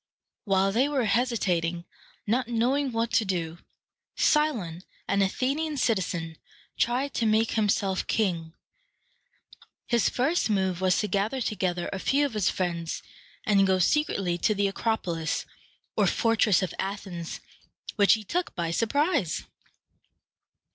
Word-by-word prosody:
While 195 -1 +2
they 255 +7 +2
were 270 -5 0
hesitating, 185 -7 0 0.4
not 235 +3 0
knowing 250 +4 +1
what 230 0 -1
to 225 - +4
do, 170 -4 -3 0.6
Cy´lon, 230 - +1 0.3
an 200 +2 +2
Athenian 280 +10 0
citizen, 180 - -1 0.4
tried 255 +4 0
to 230 - 0
make 220 +1 +2
himself 200 -3 0
king. 170 -7 -1 1.3
His 235 -5 +2
first 275 +3 +1
move 190 -3 0
was 185 -1 +3
to 210 - -1
gather 210 +6 -1
together 185 -7 -1
a 195 - -3
few 280 +8 +2
of 280 - -4
his 210 -4 +1
friends, 170 -3 -3 0.4
and 195 -2 +4
go 190 0 +3
secretly 185 - +1
to 215 - +2
the 200 0 +2
Acropolis, 190 -6 -2 0.5
or - - +3
fortress 220 -4 +3
of 185 - -3
Athens, 190 -4 -5 0.6
which 205 -2 +5
he 220 - -1
took 350 - -2
by 170 -1 -2
surprise. 280 - +1
205 Hz, 130 wpm, -27 LUFS, 180-240 Hz, 1.3 s, which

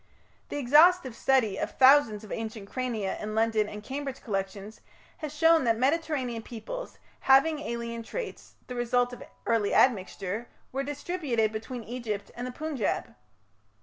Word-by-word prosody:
The - - -4
exhaustive 290 0 +5
study 235 -7 +2
of - - -1
thousands 260 -6 +6
of 215 - -11
ancient 220 -2 -5
crania 230 -5 -3
in 215 0 -4
London 220 -1 +2
and 210 0 -8
Cambridge 270 +1 -5
collections 200 0 -4 0.4
has 305 -3 -5
shown 325 +1 +4
that 230 -1 +3
Mediterranean 265 -3 0
peoples, 250 - -7 0.2
having 275 +4 +4
alien 235 -4 -4
traits, 480 - -7
the 250 - -7
result 245 0 +1
of 245 - -9 0.2
early 225 -3 +1
admixture, 205 -1 +1 0.2
were 270 - -2
distributed 285 -6 -1
between 225 +2 -6
Egypt 220 -4 -5
and 245 +1 -4
the - - -5
Punjab. 295 -3 -2
245 Hz, 145 wpm, -28 LUFS, 220-280 Hz, 0.4 s, thousands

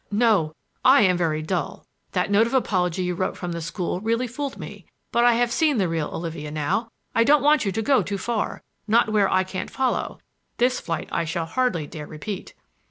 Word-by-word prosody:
"No! 205 -8 +2 0.3
I - - +7
am 185 -2 +4
very 160 -3 0
dull. 170 -1 -3 0.3
That 180 +1 0
note 215 +3 +5
of 235 - -2
apology 185 -7 +1
you 180 0 -1
wrote 185 +2 -2
from 175 -1 -4
the 170 0 -4
school 175 +2 -3
really 230 +4 0
fooled 270 +3 -5
me. - - -9 0.2
But 235 0 +3
I 240 - +6
have 240 +1 +1
seen 300 0 +2
the 190 -4 +2
real 165 -2 -2
Olivia 160 -2 -5
now. 155 +10 -1 0.2
I 230 - +4
don't 290 +4 +4
want 300 -3 +4
you 195 - 0
to 220 +4 -2
go 270 +2 +4
too 200 - -3
far—not 225 +1 -1
where 205 -2 +3
I 185 0 +3
can't 185 0 -5
follow—this 255 -1 -2
flight 165 -1 -4
I 170 - 0
shall 165 +1 -2
hardly 175 -4 0
dare 150 0 -8
repeat." 180 +6 -7
195 Hz, 200 wpm, -24 LUFS, 170-235 Hz, 0.3 s, I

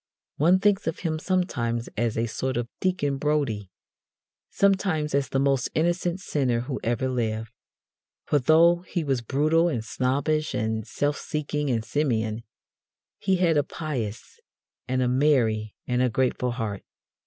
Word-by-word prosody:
One 170 +5 +5
thinks 200 0 +2
of 160 - -2
him 155 -3 -1
sometimes 120 -11 -1
as 115 0 0
a 115 - +1
sort 130 +3 -2
of 120 -1 -2
Deacon 145 -7 0
Brodie, 140 -10 0 0.8
sometimes 190 -6 +1
as 140 -1 +1
the - - 0
most 135 -1 +2
innocent 175 +2 +1
sinner 130 -9 0
who 130 +2 -4
ever 120 +3 0
lived. 115 -3 -2 0.7
For, 145 - +2
though 165 +6 +5
he 175 -1 -4
was 135 -4 0
brutal 155 +7 +2
and 120 -9 -2
snobbish 140 +6 0
and 110 0 -2
self 145 +4 -1
seeking 150 -1 -2
and 115 -3 0
simian, 115 -5 0 0.8
he 190 -1 +2
had 170 -4 +3
a 145 - +4
pious 135 -10 -5 0.5
and 130 0 +1
a - - +1
merry 125 -6 +2
and 125 0 0
a 125 - +3
grateful 125 +1 0
heart. 110 -5 -3
135 Hz, 150 wpm, -26 LUFS, 115-155 Hz, 0.8 s, One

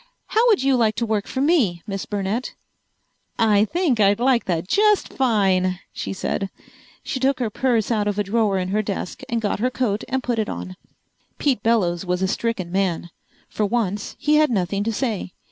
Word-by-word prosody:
How 455 +3 +3
would 425 - +4
you 270 -1 +3
like 220 -3 +2
to 235 - -1
work 215 -2 -1
for 260 - -3
me, 255 - +2
Miss 195 -1 -5
Burnett?" 205 +4 -2 0.8
"I 215 -2 +4
think 310 - 0
I'd 200 0 +4
like 250 -1 +2
that 170 -1 -1
just 420 - +2
fine," 190 -7 +2 0.2
she - - -4
said. 195 0 -2 0.5
She 260 - -3
took 270 +1 +2
her 230 -4 -1
purse 235 -2 +1
out 210 -2 +1
of 205 -1 -1
a 205 - +1
drawer 205 -1 +1
in 185 0 -2
her 210 +2 +1
desk 200 -3 -5
and 235 - 0
got 205 -3 -1
her 250 +4 +1
coat 235 -5 -1
and 265 -1 -1
put 240 -2 -1
it 215 - -1
on. 185 - -6 0.6
Pete 265 -8 +1
Bellows 195 -7 +1
was 180 0 -1
a - - +2
stricken 200 -4 -2
man. 180 -3 -1 0.4
For 210 - -1
once 205 -3 -2
he 300 0 +2
had 305 -1 +4
nothing 200 -2 0
to 225 - 0
say. 220 -6 -2
215 Hz, 195 wpm, -22 LUFS, 195-250 Hz, 0.8 s, would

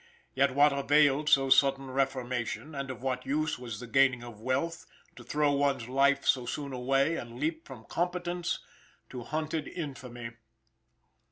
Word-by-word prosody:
Yet 135 -1 +2
what 145 0 +5
availed 145 +1 +3
so 135 -1 +4
sudden 135 -1 +4
reformation, 130 +1 -2
and 140 -1 -4
of 130 -1 -7
what 130 -1 -1
use 155 +1 -1
was 115 -4 -6
the 125 - -7
gaining 130 0 +3
of 115 -3 -10
wealth, 145 +8 -2 0.3
to - - -12
throw 150 -1 +1
one's 140 -4 +1
life 135 +2 +2
so 125 -2 +2
soon 140 +1 -4
away, 135 +6 +1
and 120 0 -8
leap 160 +2 -2
from 120 -5 -11
competence 175 0 -2 0.5
to 125 - -6
hunted 155 +4 -3
infamy. 125 -7 -7
135 Hz, 155 wpm, -30 LUFS, 125-150 Hz, 0.5 s, what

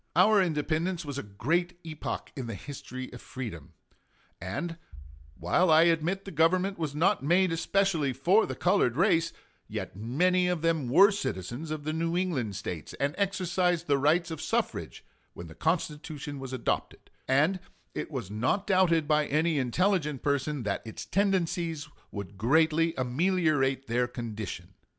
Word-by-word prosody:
Our 200 +4 +6
independence 165 +1 -1
was 140 -1 -4
a 105 -6 -10
great 175 - 0
epoch 155 -2 -5
in 130 -5 -5
the 115 - -4
history 130 +2 -8
of 125 - -9
freedom; 110 - -7 0.7
and 165 - -4 0.6
while 100 - +2
I 160 +1 +7
admit 170 +3 +1
the 195 - -7
Government 180 +4 +2
was 150 -3 -3
not 185 +7 +2
made 175 +4 +3
especially 165 -3 +1
for 175 - +3
the - - -4
colored 180 -10 +2
race, 165 -3 +3 0.4
yet - - -5
many 180 - +2
of 175 -3 -1
them 160 -6 +1
were 195 - +7
citizens 130 - -4
of 155 -1 -4
the 155 +1 -2
New 165 +2 -1
England 135 - -1
States, 90 -5 -6
and 140 +1 -1
exercised 180 -3 0
the 140 -3 +2
rights 165 +4 +2
of 160 - -5
suffrage - - -2 0.3
when 85 - -8
the 80 - -11
Constitution 150 - -2
was 135 -1 -7
adopted, 130 -3 -3 0.2
and 150 +8 +3 0.3
it - - -4
was 95 - -5
not 125 - 0
doubted 170 -5 +3
by 150 -1 +2
any 155 +1 +1
intelligent 150 - 0
person 145 -1 0
that 105 -2 -2
its 110 -2 -7
tendencies 175 -5 0 0.2
would 100 -1 -8
greatly 160 +6 +3
ameliorate 135 -1 +1
their 120 +1 +1
condition. 110 -7 -6
155 Hz, 155 wpm, -29 LUFS, 130-175 Hz, 0.7 s, I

